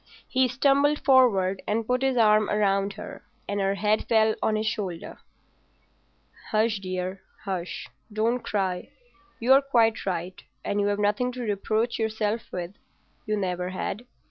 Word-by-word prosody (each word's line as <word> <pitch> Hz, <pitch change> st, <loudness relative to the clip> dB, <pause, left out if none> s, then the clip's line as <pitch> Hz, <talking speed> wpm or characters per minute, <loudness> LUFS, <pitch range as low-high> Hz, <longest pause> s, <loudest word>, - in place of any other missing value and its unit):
He 260 Hz, 0 st, +2 dB
stumbled 280 Hz, +3 st, +3 dB
forward 205 Hz, -9 st, +4 dB
and 225 Hz, +1 st, 0 dB
put 250 Hz, +2 st, 0 dB
his 265 Hz, -1 st, +1 dB
arm 215 Hz, -2 st, +4 dB
round 200 Hz, -1 st, +1 dB
her, 210 Hz, -, -9 dB, 0.2 s
and 205 Hz, 0 st, -2 dB
her 195 Hz, 0 st, +1 dB
head 210 Hz, +1 st, +1 dB
fell 220 Hz, -1 st, +4 dB
on 215 Hz, -, +1 dB
his 215 Hz, +1 st, -1 dB
shoulder. 200 Hz, -6 st, -4 dB, 1.3 s
"Hush, 220 Hz, -1 st, +1 dB
dear, 185 Hz, 0 st, -4 dB, 0.2 s
hush! 185 Hz, -3 st, -4 dB, 0.2 s
Don't 225 Hz, +4 st, +1 dB
cry. 190 Hz, -5 st, -2 dB, 0.5 s
You're 265 Hz, +4 st, +5 dB
quite 230 Hz, -5 st, +2 dB
right, 180 Hz, 0 st, -3 dB, 0.2 s
and 205 Hz, 0 st, 0 dB
you've 205 Hz, 0 st, +1 dB
nothing 210 Hz, +5 st, +1 dB
to 250 Hz, -, -6 dB
reproach 220 Hz, +2 st, -1 dB
yourself 220 Hz, 0 st, -2 dB
with—you 185 Hz, +3 st, -7 dB
never 180 Hz, -2 st, -2 dB
had. 210 Hz, +5 st, -4 dB
215 Hz, 140 wpm, -26 LUFS, 195-230 Hz, 1.3 s, You're